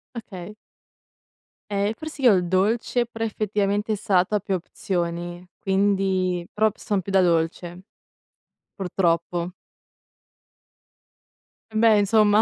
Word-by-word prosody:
Okay. 210 -3 -8 1.2
Ehm, 200 +2 0
forse 310 +1 -8
io 240 - +7
il 180 -2 +1
dolce, 220 +6 +1
però 225 -1 -6
effettivamente 210 0 -1
il - - -2
salato 195 0 +2
ha - - +2
più 195 0 -3
opzioni, 175 0 -4
quindi 190 -2 +1
però 215 0 +3
p - - -27
son 200 -2 -1
più 195 - -6
da 190 -1 +5
dolce, 170 +1 0 0.9
purtroppo. 175 -1 -1 2.2
Eh, - - -12
beh 220 -1 +5
insomma. 210 +1 +4
195 Hz, 115 wpm, -24 LUFS, 180-215 Hz, 2.2 s, io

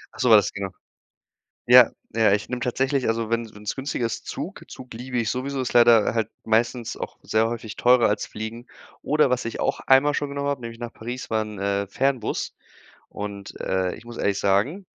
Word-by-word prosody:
Ach - - -14
so 125 - +2
das 105 -3 +6
genau. 100 -1 -4 1.0
Ja, 125 -1 +8 0.2
ja, 110 -3 +4
ich 105 +1 -1
nehme 125 -1 -3
tatsächlich, 135 +2 0
also 115 0 -1
wenn 115 -1 -1
wenn's 105 0 -5
günstiger 135 -3 -2
ist, 115 - -4
Zug, - - -6
Zug 125 -2 -11
liebe 125 +2 -5
ich 115 -2 0
sowieso, 130 +1 -3
ist 125 - -3
leider 120 -3 +6
halt 115 -1 -1
meistens 115 +1 0
auch - - -7
sehr 110 +1 +2
häufig 115 -2 -6
teurer 125 -1 +4
als 105 0 -1
Fliegen. 110 +3 -7 0.3
Oder 150 -3 +2
was 125 -1 0
ich 115 - -5
auch - - 0
einmal 135 +2 +5
schon 145 -1 -2
genommen 140 0 -3
hab, 140 -3 -1
nämlich 115 -1 -8
nach 120 -1 -6
Paris, 120 +1 -7
war 110 0 +2
'n, 105 -1 -9
äh, 100 0 -1
Fernbus 130 +1 -1 0.6
und, 100 -1 -7
äh, 95 -1 -1
ich 115 - -15
muss 120 0 -9
ehrlich 100 -1 0
sagen, 120 - +1
115 Hz, 200 wpm, -24 LUFS, 110-125 Hz, 1.0 s, Ja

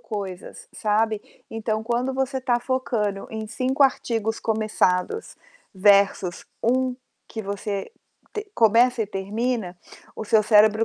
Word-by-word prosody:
coisas, 195 -5 -7
sabe. 215 0 +1 0.3
Então 220 -1 -2
quando 240 +3 -1
você 265 0 -1
tá 245 -2 +1
focando 230 -6 -1
em 220 -1 -5
5 260 +5 0
artigos 225 -4 0
começados, 215 - 0 0.4
versus 195 -2 +3 0.2
1 255 +2 +1 0.3
que 220 - -5
você 200 - -4 0.4
te 425 -2 -6
começa 235 +2 +4
e - - -4
termina, 205 0 -2 0.4
o - - -4
seu 215 +1 +4
cérebro 215 +1 +5
220 Hz, 120 wpm, -24 LUFS, 205-245 Hz, 0.4 s, cérebro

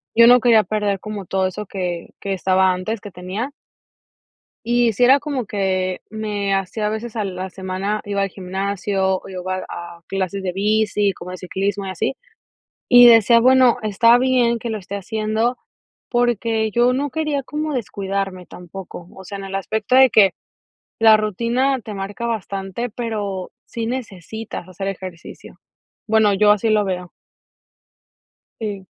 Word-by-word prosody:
yo 230 0 +8
no 245 0 +8
quería 225 -2 +5
perder 205 -2 -1
como 210 -2 -6
todo 190 -1 0
eso, 210 +3 -6
que 180 -3 -4
que 195 -1 -3
estaba 185 0 +2
antes 205 +4 -3
que 205 - -9
tenía 190 +10 -5 1.1
y 240 -1 +2
sí 245 +4 +2
era 270 +3 +6
como 270 -7 -3
que 185 -2 -1
me 205 -2 -2
hacía 195 +3 -2
a - - +2
veces 220 +1 -5
a 215 - -1
la 185 0 -5
semana, 190 +3 -3
iba 200 -1 -1
al 195 - 0
gimnasio 190 0 -1
o - - -13
iba 185 0 -4
a 170 0 -8
clases 195 0 -2
de 180 -1 -2
bici, 210 0 +1
como 180 0 -9
de 185 - -6
ciclismo 195 +2 -2
y - - -3
así, 185 +8 -2 0.7
y 245 0 +9
decía, 230 0 +7
bueno, 255 0 +5
está 230 +3 +4
bien 245 -2 +2
que 235 - -5
lo 220 - -2
esté 200 +1 -7
haciendo, 220 +4 -1 0.5
porque, 230 -2 +1
yo 240 +3 +3
no 280 +2 -1
quería 300 -3 -1
como 305 +2 -3
descuidarme 195 -5 -3
tampoco, 180 -1 -10
o 190 - -11
sea, 200 +2 -7
en 195 - -7
el 195 - -8
aspecto 215 +4 -1
de 265 -1 +7
que 195 -3 +5 0.7
la 220 -1 +7
rutina 235 +6 0
te 210 -1 -8
marca 200 +4 -5
bastante, 200 +1 -4
pero, 205 -5 -4
sí 230 -1 -4
necesitas 220 -5 -6
hacer 195 +2 -6
ejercicio. 185 -3 -9 0.5
Bueno, 215 -2 +3
yo 210 +1 +5
así 210 +2 0
lo 210 -1 +3
veo. 180 -2 -4 1.5
Sí. 200 -4 -5
205 Hz, 160 wpm, -20 LUFS, 190-230 Hz, 1.5 s, y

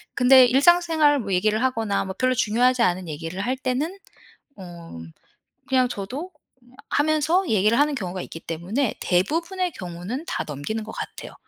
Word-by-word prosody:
근데 255 +1 +7
일상생활 310 +1 +4
뭐 200 -5 -3
얘기를 215 +5 +1
하거나 225 -6 0
뭐 190 0 -6
별로 255 0 +2
중요하지 245 +3 +2
않은 180 -2 0
얘기를 165 +5 -5
할 250 +5 -1
때는 265 +9 -2 0.6
어. 170 - -10 0.7
그냥 260 -1 +3
저도 250 - -6 0.6
하면서 310 +5 +1
얘기를 215 +3 +2
하는 295 +1 +2
경우가 185 -7 -4
있기 165 - -9
때문에 195 - -2
대부분의 335 - 0
경우는 180 - -6
다 - - -2
넘기는 150 +10 -4
것 220 - -9
같아요. - - -8
240 Hz, 335 characters per minute, -23 LUFS, 185-290 Hz, 0.7 s, 근데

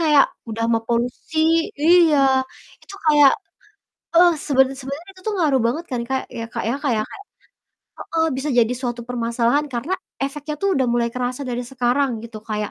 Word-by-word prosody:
kayak 300 -4 +5 0.2
udah 225 +1 -2
mah 225 -1 +1
polusi 240 +6 -2 0.4
iya, 330 -2 +5 0.6
itu - - -12
kayak, 295 -2 +7 0.8
eh, 350 +1 +7 0.2
sebener 265 -2 +3
sebenarnya 280 +7 -7
itu 375 - -16
tuh 420 - -1
ngaruh 290 -6 +3
banget 310 +9 -2
kan, 250 - -2
Kak, 265 0 0 0.2
ya, 230 - -3
Kak, - - -3
ya. - - 0
Kayak 225 -6 +1
kayak - - -9 0.8
Heeh, 325 -1 -1
bisa 270 +3 -3
jadi 235 0 +4
suatu 240 -2 -3
permasalahan 240 +4 0
karena 265 +6 -4 0.3
efeknya 295 +2 -5
tuh 395 - +1
udah 265 -2 +1
mulai 240 -1 +1
kerasa 250 +2 -3
dari 245 0 -2
sekarang 260 +2 +1
gitu, 230 -2 -8
kayak, 210 -1 -2
265 Hz, 170 wpm, -21 LUFS, 240-300 Hz, 0.8 s, kayak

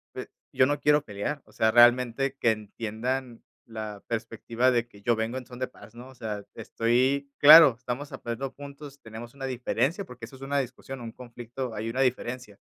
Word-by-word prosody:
eh: - - -6 0.3
"Yo 130 - +5
no 145 +1 0
quiero 150 0 +3
pelear". 115 +8 -4
O - - -21
sea, 110 0 +2
realmente 120 +3 +4
que 115 - +4
entiendan 115 +4 -4 0.2
la 110 -3 -7
perspectiva 115 +1 -1
de 120 -2 +1
que 100 -4 -18
yo 120 +3 +2
vengo 110 +3 -2
en 130 - -7
son 125 - -11
de 130 - -1
paz, 115 -2 -16
¿no? 125 +2 -11
O 130 - -15
sea, 105 -3 -5
estoy 130 +5 0
Claro, 150 -3 +10
estamos 125 +3 -5
aprendiendo 120 +3 -5
juntos, 140 0 -11
tenemos 115 +1 -10
una 135 -1 -6
diferencia, 135 - -1
porque, 125 -2 -10
eso 125 - -14
es 130 - -16
una 140 +1 -1
discusión, 130 +1 -6
un 115 -1 -7
conflicto, 120 +1 -7
hay 110 +1 -4
una 130 +3 -1
diferencia. 125 -4 -2
125 Hz, 195 wpm, -27 LUFS, 115-135 Hz, 0.3 s, Claro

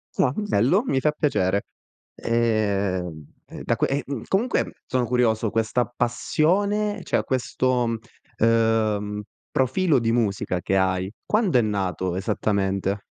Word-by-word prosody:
Ah, 125 - +2
bello. 195 - +2
Mi 135 - +1
fa 150 - +2
piacere. 100 -10 0 0.5
Ehm, 100 -8 0 0.2
e - - -9
da - - +1
que - - +1
ehm, 135 -3 -3
comunque 230 +6 0
sono 125 -1 0
curioso, 115 -2 +1
questa 115 +2 +1
passione 195 - 0
cioè - - +1
questo, 130 -1 0 0.5
uhm, 110 -2 +1 0.3
profilo 135 +3 +2
di 115 -1 0
musica 100 -5 0
che 95 +3 0
hai, 95 0 0
quando 210 - +2
è - - +5
nato 95 -4 -1
esattamente? 100 -1 -1
115 Hz, 125 wpm, -24 LUFS, 100-130 Hz, 0.5 s, è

